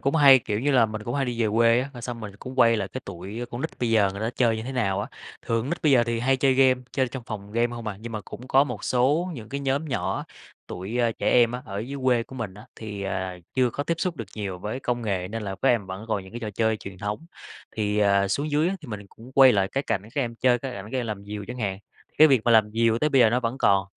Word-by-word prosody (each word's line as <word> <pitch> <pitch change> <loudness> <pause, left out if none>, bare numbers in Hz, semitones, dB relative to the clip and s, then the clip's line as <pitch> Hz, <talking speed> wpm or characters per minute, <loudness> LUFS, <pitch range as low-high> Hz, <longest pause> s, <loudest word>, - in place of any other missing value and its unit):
cũng 140 +3 0
hay, 140 -3 +8
kiểu 105 -3 -3
như 145 +4 +1
là, 125 -4 +5
mình 110 0 -6
cũng 120 +4 -4
hay 140 - +1
đi 120 -2 -2
về 110 - +2
quê 115 +1 +5
á, 135 +2 -5
rồi 120 - -10
xong 120 -1 -5
mình 105 -2 -8
cũng 130 +3 -8
quay 115 -2 +6
lại 100 -3 -2
cái 130 - -6
tụi, 100 +4 -7
a, - - -2
con 120 - -5
nít - - -2
bây 120 -2 0
giờ 105 -4 +4
người 100 - -7
ta 110 +1 -1
chơi 115 -3 +3
như 110 - -4
thế 130 +4 -5
nào 100 -7 0
á, - - -3 0.4
thường 115 0 +1
con 130 - -5
nít 175 - -3
bây 150 -3 +4
giờ 120 -2 +5
thì 115 0 -2
hay 135 +2 +2
chơi 135 0 +3
game, 130 -1 +4
chơi 130 -2 +1
trong 125 +1 -7
phòng 105 -2 -7
game 115 +1 +2
hông 115 -1 -7
à. 105 -2 -3
Nhưng 115 +1 -7
mà 110 - -3
cũng 125 +6 -10
có 135 +1 +5
một - - -6
số 145 +9 +2
những 115 -5 -9
cái 140 +1 -4
nhóm 140 +2 0
nhỏ, 140 -5 -2 0.4
tụi, 95 +7 -5
ơ, 120 -2 +2
trẻ - - -1
em 120 -1 +5
á, 125 +1 -5
ở 100 -1 -5
dưới 135 +6 -5
quê 125 -2 +3
của 130 - -12
mình 115 -7 -5
á, 105 +2 -13
thì, 105 -3 -6
à, 95 -2 -3 0.2
chưa 130 -2 +3
có 145 - -3
tiếp 170 - 0
xúc 180 -3 -1
được 115 - -6
nhiều 100 -4 -4
với 105 +8 -4
công 120 -2 -2
nghệ 95 -4 -2
nên 115 +2 -4
là 95 -1 -4
các 135 - +4
em 115 -6 +2
vẫn 95 +3 -7
còn 105 -3 -1
những 95 - -14
cái 120 - -6
trò 110 -3 -4
chơi 110 +2 +1
truyền 100 -3 -10
thống, 105 - -4 0.5
thì, 105 -1 0
ờ, 100 -1 +3
xuống 145 +10 -1
dưới 150 +3 +2
á 195 - -2
thì 150 - -11
mình 105 -2 -5
cũng 120 +6 -15
quay 130 -1 +7
lại 95 -3 +2
cái 135 - -1
cảnh 110 -8 -1
các 145 - +1
em 120 -2 -4
chơi, 125 0 +3
cái 130 +1 -5
cảnh 100 -2 -7
các 130 - 0
em 120 - -2
làm 105 -2 -5
diều 105 0 -6
chẳng 125 +1 -6
hạn, 100 -4 -2 0.4
cái 155 - +9
việc 135 -4 +4
mà 120 - +3
làm 110 -2 +5
diều 115 0 +2
tới 150 +4 +1
bây 135 -3 +4
giờ 115 -3 +6
nó 125 +2 +1
vẫn 120 +2 -2
còn. 100 -4 +3
115 Hz, 315 wpm, -25 LUFS, 105-130 Hz, 0.5 s, cái